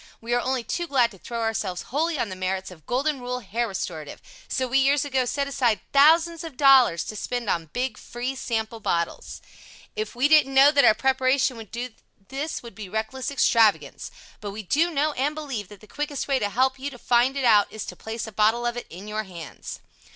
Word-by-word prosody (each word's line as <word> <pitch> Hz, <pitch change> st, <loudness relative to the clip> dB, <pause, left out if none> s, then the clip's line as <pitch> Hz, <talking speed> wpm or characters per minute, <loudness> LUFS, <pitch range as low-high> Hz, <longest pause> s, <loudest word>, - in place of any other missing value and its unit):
We 235 Hz, +1 st, -3 dB
are 245 Hz, -, +2 dB
only 255 Hz, -1 st, -1 dB
too 345 Hz, +8 st, -3 dB
glad 250 Hz, -6 st, +3 dB
to 195 Hz, -, -15 dB
throw 235 Hz, +4 st, -5 dB
ourselves 220 Hz, -5 st, -2 dB
wholly 320 Hz, +2 st, +1 dB
on 230 Hz, -, -1 dB
the 185 Hz, -, -6 dB
merits 185 Hz, 0 st, -3 dB
of 160 Hz, -4 st, -15 dB
Golden 275 Hz, +3 st, 0 dB
Rule 250 Hz, 0 st, -4 dB
Hair 230 Hz, +3 st, -2 dB
Restorative, 165 Hz, -6 st, -5 dB, 0.3 s
so 260 Hz, -, -1 dB
we 265 Hz, +2 st, +2 dB
years 280 Hz, +2 st, +3 dB
ago 265 Hz, -2 st, 0 dB
set 280 Hz, +3 st, -1 dB
aside 240 Hz, -7 st, +1 dB
thousands 320 Hz, +4 st, +5 dB
of 320 Hz, -6 st, -8 dB
dollars 265 Hz, -, +6 dB
to 215 Hz, -, -7 dB
spend 245 Hz, +1 st, -3 dB
on 165 Hz, -2 st, -2 dB
big 250 Hz, -3 st, -3 dB
free 245 Hz, +2 st, -4 dB
Sample 225 Hz, -3 st, -3 dB
bottles. 170 Hz, -5 st, -3 dB, 0.5 s
If 435 Hz, -, -4 dB
we 255 Hz, +4 st, +3 dB
didn't 290 Hz, -3 st, +4 dB
know 275 Hz, +2 st, +8 dB
what 285 Hz, -1 st, +4 dB
our 215 Hz, -, +6 dB
preparation 260 Hz, +1 st, +2 dB
would 220 Hz, -3 st, -10 dB
do 245 Hz, +2 st, -5 dB, 0.4 s
this 280 Hz, +3 st, -4 dB
would 235 Hz, -, -10 dB
be 200 Hz, -1 st, -9 dB
reckless 220 Hz, +5 st, -3 dB
extravagance. 230 Hz, -6 st, +2 dB, 0.3 s
But 205 Hz, -, -6 dB
we 210 Hz, +2 st, -7 dB
do 315 Hz, -, +2 dB
know 305 Hz, -1 st, +1 dB
and 290 Hz, +2 st, -1 dB
believe 270 Hz, -10 st, -5 dB
that 205 Hz, 0 st, -14 dB
the 215 Hz, -, -15 dB
quickest 295 Hz, +1 st, -4 dB
way 275 Hz, -2 st, +2 dB
to 205 Hz, -3 st, -1 dB
help 260 Hz, +4 st, +1 dB
you 280 Hz, +2 st, -3 dB
to 260 Hz, -, -12 dB
find 245 Hz, +3 st, +2 dB
it 270 Hz, -, 0 dB
out 210 Hz, -3 st, +5 dB
is 220 Hz, -, -6 dB
to -, -, -8 dB
place 220 Hz, +1 st, -5 dB
a 220 Hz, -, -8 dB
bottle 220 Hz, +3 st, +2 dB
of 240 Hz, 0 st, -1 dB
it 240 Hz, -, -6 dB
in 185 Hz, +5 st, -10 dB
your 215 Hz, +1 st, -3 dB
bands. 170 Hz, -5 st, -9 dB
245 Hz, 220 wpm, -25 LUFS, 215-275 Hz, 0.5 s, know